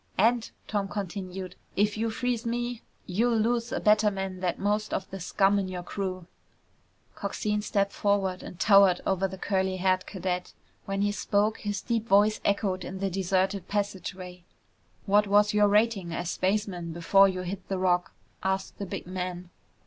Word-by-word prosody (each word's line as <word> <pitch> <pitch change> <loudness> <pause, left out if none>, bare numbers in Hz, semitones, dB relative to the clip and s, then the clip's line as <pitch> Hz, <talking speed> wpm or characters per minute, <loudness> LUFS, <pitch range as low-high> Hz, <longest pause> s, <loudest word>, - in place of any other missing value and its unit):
"And," 230 +3 +3 0.2
Tom 205 -2 -1
continued, 190 -2 -5 0.2
"if 210 +1 +2
you 225 +1 -1
freeze 240 +1 -1
me, 240 0 -2 0.2
you'll 230 +6 +1
lose 235 +1 0
a - - -1
better 215 0 +4
man 190 -2 -4
than 180 -2 0
most 210 +1 0
of 190 - -3
the 195 - -6
scum 195 +3 +2
in 195 - -2
your 180 -1 -5
crew!" 185 -1 -4 0.9
Coxine 210 +1 -2
stepped 200 -1 0
forward 195 -3 0
and 180 - -10
towered 195 -4 +6
over 195 0 +1
the 190 0 -8
curly 190 -1 0
haired 185 0 +1
cadet. 180 -2 -3 0.3
When 195 0 -1
he 205 - +2
spoke, 205 +1 0
his 205 -1 -3
deep 230 -2 -1
voice 205 +1 +4
echoed 195 -2 0
in 190 - -6
the 195 0 -2
deserted 190 0 0
passageway. 185 -3 -4 0.6
"What 205 0 +4
was 205 +1 +4
your 210 0 +5
rating 205 -4 +2
as 175 +1 -2
spaceman 185 -4 -1
before 195 +4 +5
you 185 -1 -3
hit 185 +1 -6
the 195 - -2
Rock?" 180 0 +1 0.3
asked 190 0 -2
the 200 - -4
big - - -5
man. 180 -1 -5
195 Hz, 170 wpm, -28 LUFS, 185-210 Hz, 0.9 s, towered